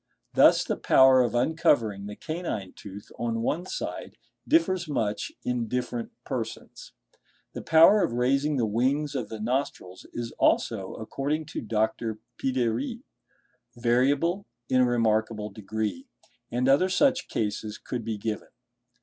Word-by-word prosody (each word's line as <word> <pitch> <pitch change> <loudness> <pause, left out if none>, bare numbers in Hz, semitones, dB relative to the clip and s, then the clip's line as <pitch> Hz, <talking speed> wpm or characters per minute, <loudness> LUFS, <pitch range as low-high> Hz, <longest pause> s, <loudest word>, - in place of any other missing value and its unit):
Thus - - +6
the - - -2
power 130 -1 +6
of 120 -1 0
uncovering 120 - +1
the 105 - -7
canine 155 - -5
tooth 100 0 -11
on 115 -1 -1
one 170 +9 -1
side - - -5 0.3
differs 185 - +2
much 110 -8 -2
in 125 -2 -1
different 120 0 -3
persons. - - -6 0.6
The - - -6
power 165 +6 +6
of - - 0
raising 135 +5 +1
the 120 - +2
wings 130 +7 0
of 125 -6 -3
the 110 - -6
nostrils 110 -6 -3
is 120 -1 -5
also, - - +1
according 150 +3 -3
to - - -3
Dr. 110 0 -1 0.2
Piderit, 130 - -1 0.7
variable 135 +10 +1 0.2
in 130 0 +4
a - - +5
remarkable 110 -2 0
degree; 110 - -4 0.4
and 125 +2 0
other 145 +8 +4
such 260 +7 +2
cases 105 0 -3
could 120 -2 -5
be 110 -1 -3
given. 105 0 -4
125 Hz, 135 wpm, -27 LUFS, 110-150 Hz, 0.7 s, Thus